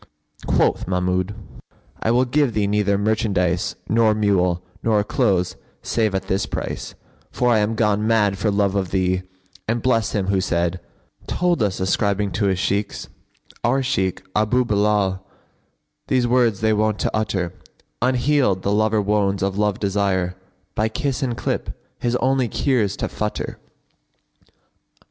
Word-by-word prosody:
Quoth -, -, +2 dB
Mahmud, 90 Hz, +2 st, 0 dB, 0.7 s
"I -, -, 0 dB
will 125 Hz, +2 st, +3 dB
give 140 Hz, -1 st, +1 dB
thee 105 Hz, -1 st, +2 dB
neither 100 Hz, 0 st, +1 dB
merchandise 100 Hz, -5 st, 0 dB
nor 110 Hz, -1 st, +3 dB
mule 90 Hz, -4 st, +1 dB, 0.2 s
nor 110 Hz, -2 st, +2 dB
clothes 95 Hz, -6 st, 0 dB, 0.3 s
save 110 Hz, -4 st, 0 dB
at 95 Hz, -, -1 dB
this 95 Hz, 0 st, -1 dB
price; -, -, -5 dB, 0.4 s
for 125 Hz, -, +1 dB
I 110 Hz, -, +4 dB
am 105 Hz, +2 st, 0 dB
gone 105 Hz, -1 st, +1 dB
mad 105 Hz, -4 st, +2 dB
for 105 Hz, -, +1 dB
love 100 Hz, -1 st, +1 dB
of 95 Hz, -3 st, -1 dB
thee, 95 Hz, -1 st, +1 dB, 0.5 s
and 115 Hz, +1 st, -1 dB
bless 115 Hz, -4 st, +1 dB
him 100 Hz, -3 st, 0 dB
who 95 Hz, -1 st, +2 dB
said, 85 Hz, -1 st, 0 dB, 0.5 s
'Told 175 Hz, -4 st, +1 dB
us, 100 Hz, -4 st, 0 dB
ascribing 100 Hz, +1 st, 0 dB
to 100 Hz, -, 0 dB
his 95 Hz, -2 st, +1 dB
Shaykhs, 100 Hz, +2 st, -2 dB, 0.5 s
our 130 Hz, +3 st, +2 dB
Shaykh 95 Hz, -9 st, -1 dB
* -, -, -40 dB
Abъ 110 Hz, +4 st, +3 dB
Bilбl, 105 Hz, -3 st, +1 dB, 0.9 s
these 130 Hz, -2 st, +2 dB
words 120 Hz, -4 st, +2 dB
they 110 Hz, 0 st, +3 dB
wont 110 Hz, 0 st, +1 dB
to -, -, 0 dB
utter:[FN#52] 95 Hz, -5 st, -1 dB, 0.5 s
Unhealed 125 Hz, -5 st, +2 dB
the 100 Hz, -, +1 dB
lover 110 Hz, 0 st, +2 dB
wones 100 Hz, -1 st, +1 dB
of 100 Hz, +1 st, -1 dB
love 105 Hz, -2 st, +1 dB
desire, 95 Hz, -3 st, 0 dB, 0.2 s
* -, -, -43 dB
By 110 Hz, +1 st, 0 dB
kiss 135 Hz, +4 st, -2 dB
and 125 Hz, -4 st, -1 dB
clip, -, -, -3 dB, 0.2 s
his 120 Hz, 0 st, 0 dB
only 130 Hz, 0 st, +1 dB
cure's 115 Hz, -5 st, 0 dB
to -, -, -2 dB
futter!'" 105 Hz, 0 st, -4 dB
105 Hz, 155 wpm, -22 LUFS, 95-115 Hz, 0.9 s, I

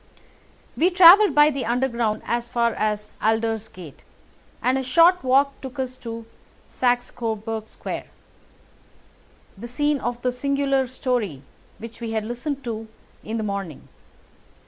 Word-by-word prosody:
We 345 Hz, -, +3 dB
travelled 375 Hz, +3 st, +7 dB
by 295 Hz, +1 st, +6 dB
the 275 Hz, -2 st, -3 dB
Underground 235 Hz, -2 st, -1 dB
as 240 Hz, 0 st, -2 dB
far 235 Hz, -1 st, +1 dB
as 210 Hz, 0 st, -3 dB
Aldersgate; 220 Hz, -7 st, -2 dB, 0.6 s
and 260 Hz, +2 st, +1 dB
a -, -, -3 dB
short 335 Hz, +6 st, +4 dB
walk 275 Hz, +2 st, +2 dB
took 265 Hz, +1 st, -8 dB
us 260 Hz, -1 st, -3 dB
to 230 Hz, -2 st, -7 dB, 0.4 s
Saxe 245 Hz, -1 st, 0 dB
Coburg 220 Hz, -1 st, -4 dB
Square, -, -, -6 dB, 1.5 s
the 220 Hz, +5 st, -8 dB
scene 290 Hz, +4 st, 0 dB
of 240 Hz, -1 st, -3 dB
the 250 Hz, -, +1 dB
singular 275 Hz, +1 st, 0 dB
story 235 Hz, -, -2 dB, 0.3 s
which 230 Hz, +1 st, -11 dB
we 225 Hz, -1 st, -4 dB
had 220 Hz, -1 st, -1 dB
listened 265 Hz, +5 st, -4 dB
to 225 Hz, -2 st, -5 dB, 0.4 s
in 225 Hz, +1 st, -4 dB
the 220 Hz, -, -2 dB
morning. 200 Hz, -7 st, -5 dB
240 Hz, 135 wpm, -23 LUFS, 225-270 Hz, 1.5 s, travelled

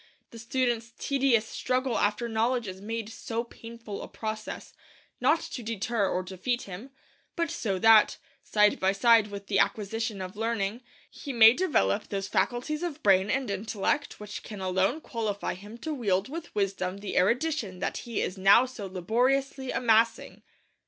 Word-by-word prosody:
The 230 Hz, -, -10 dB
student's 235 Hz, -1 st, -1 dB
tedious 265 Hz, -5 st, +2 dB
struggle 255 Hz, +1 st, -1 dB
after 210 Hz, +3 st, +1 dB
knowledge 230 Hz, +1 st, 0 dB
is 190 Hz, 0 st, -7 dB
made 225 Hz, +1 st, -4 dB
so 225 Hz, +1 st, -4 dB
painful 230 Hz, -3 st, -9 dB
a -, -, -7 dB
process, 215 Hz, -1 st, -6 dB, 0.5 s
not -, -, +3 dB
to 250 Hz, -, -6 dB
deter 225 Hz, -2 st, -1 dB
or 185 Hz, -, -1 dB
defeat 190 Hz, +7 st, -2 dB
him, 200 Hz, +7 st, -9 dB, 0.5 s
but 335 Hz, -2 st, -1 dB
so 215 Hz, -, -2 dB
that, 220 Hz, +2 st, +6 dB, 0.2 s
side 210 Hz, -1 st, +3 dB
by 190 Hz, +1 st, +2 dB
side 225 Hz, +1 st, +5 dB
with 200 Hz, -1 st, -8 dB
the 195 Hz, -1 st, +1 dB
acquisition 210 Hz, +1 st, -1 dB
of 185 Hz, 0 st, -6 dB
learning, 225 Hz, 0 st, -2 dB, 0.3 s
he 285 Hz, -, -8 dB
may 225 Hz, -2 st, +8 dB
develop 255 Hz, -, +1 dB
those 195 Hz, -1 st, -3 dB
faculties 250 Hz, -, -1 dB
of 330 Hz, -4 st, -4 dB
brain 195 Hz, 0 st, +4 dB
and 260 Hz, -3 st, 0 dB
intellect 210 Hz, +7 st, -2 dB
which 210 Hz, 0 st, -7 dB
can 210 Hz, -3 st, -9 dB
alone 190 Hz, +10 st, 0 dB
qualify 215 Hz, -6 st, -3 dB
him 205 Hz, +5 st, -11 dB
to 310 Hz, +6 st, -4 dB
wield 200 Hz, -6 st, 0 dB
with 330 Hz, -1 st, -7 dB
wisdom 195 Hz, -2 st, -1 dB
the 200 Hz, 0 st, -6 dB
erudition 235 Hz, -, +1 dB
that -, -, -2 dB
he 235 Hz, -3 st, -3 dB
is 190 Hz, -, -4 dB
now 195 Hz, +6 st, +6 dB
so 240 Hz, -6 st, -7 dB
laboriously 255 Hz, +8 st, 0 dB
amassing. 230 Hz, -2 st, +2 dB
225 Hz, 160 wpm, -28 LUFS, 200-245 Hz, 0.5 s, may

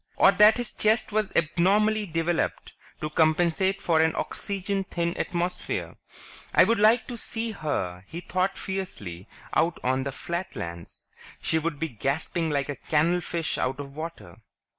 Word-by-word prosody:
Or -, -, +6 dB
that 210 Hz, +2 st, +6 dB
his 245 Hz, -2 st, -4 dB
chest 220 Hz, +1 st, +2 dB
was 215 Hz, -1 st, 0 dB
abnormally 205 Hz, +6 st, +2 dB
developed 165 Hz, 0 st, -1 dB, 0.3 s
to 155 Hz, -, -3 dB
compensate 175 Hz, +5 st, +2 dB
for 160 Hz, -2 st, +3 dB
an 160 Hz, 0 st, +2 dB
oxygen 200 Hz, 0 st, -2 dB
thin 170 Hz, -2 st, -2 dB
atmosphere? 175 Hz, +1 st, -2 dB, 0.6 s
I'd -, -, +6 dB
like 220 Hz, +2 st, +5 dB
to 240 Hz, -, -6 dB
see 225 Hz, 0 st, -2 dB
her, 95 Hz, -, -3 dB
he 165 Hz, -, -6 dB
thought 185 Hz, +2 st, -1 dB
fiercely, 100 Hz, -, -5 dB, 0.3 s
out 165 Hz, 0 st, +2 dB
on 130 Hz, +1 st, +1 dB
the 140 Hz, -, -3 dB
Flatlands; 110 Hz, -, -6 dB, 0.3 s
she'd 160 Hz, -1 st, 0 dB
be 160 Hz, +2 st, -2 dB
gasping 150 Hz, -, -1 dB
like 140 Hz, -2 st, -1 dB
a 145 Hz, -, -3 dB
canal 165 Hz, +4 st, +1 dB
fish 165 Hz, -1 st, -2 dB
out 130 Hz, +2 st, -1 dB
of 140 Hz, -1 st, -7 dB
water. 155 Hz, -, -7 dB
170 Hz, 145 wpm, -26 LUFS, 150-195 Hz, 0.6 s, Or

